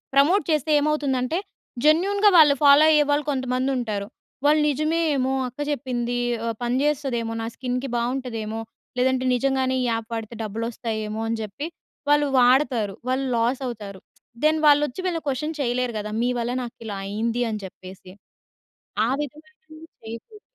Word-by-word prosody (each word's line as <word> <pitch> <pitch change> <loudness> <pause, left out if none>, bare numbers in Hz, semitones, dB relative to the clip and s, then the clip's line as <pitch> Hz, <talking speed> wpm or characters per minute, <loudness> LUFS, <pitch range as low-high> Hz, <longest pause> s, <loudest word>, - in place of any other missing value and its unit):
Promote 335 +9 +4
చేస్తే 310 0 +1
ఏమవుతుందంటే 290 0 0 0.5
జెన్యూన్‌గా 395 +7 +4
వాళ్ళు 300 -3 +7
ఫాలో 285 +1 +7
అయ్యేవాళ్ళు 295 -1 +3
కొంతమంది 260 -1 -1
ఉంటారు. 210 -4 -3 0.4
వాళ్ళు 300 +1 +5
నిజమేమో 300 -2 +1 0.2
అక్క 250 +4 -12
చెప్పింది, 245 -3 -2 0.3
ఆహ్, 230 -1 -1
పనిజేస్తదేమో, 255 -2 0
నా - - -3
స్కిన్‌కి 250 +1 -3
బావుంటదేమో! 235 -3 -3 0.4
లేదంటే 260 0 +2
నిజంగానే 260 0 +1
ఈ - - 0
యాప్ 225 -1 -3
వాడితే 225 0 -5
డబ్బులోస్తాయేమో! 220 0 -4
అని 225 0 -1
జెప్పి 215 +9 -5 0.4
వాళ్ళు 295 0 +4
వాడతారు. 245 -5 +3
వాళ్ళు 260 +1 0
లాస్ 240 +4 +1
అవుతారు. 210 -5 -7 0.4
దెన్ 310 +1 +3
వాళ్ళు 290 0 +6
వచ్చి 250 - -7
వీళ్ళని 335 -3 -2
క్వశ్చన్ 300 +4 -2
చేయలేరు 250 -1 0
కదా! 210 0 -5
మీ 245 - +1
వల్ల 235 +1 -1
నాకు 240 -1 -8
ఇలా 205 - -4
అయింది? 225 +4 -1
అని 215 -1 -4
చెప్పేసి 185 0 -11 0.9
ఆ - - 0
విధమైనవి 310 +2 -10 0.2
చేయకుడదు. 230 - -9
255 Hz, 140 wpm, -24 LUFS, 230-295 Hz, 0.9 s, వాళ్ళు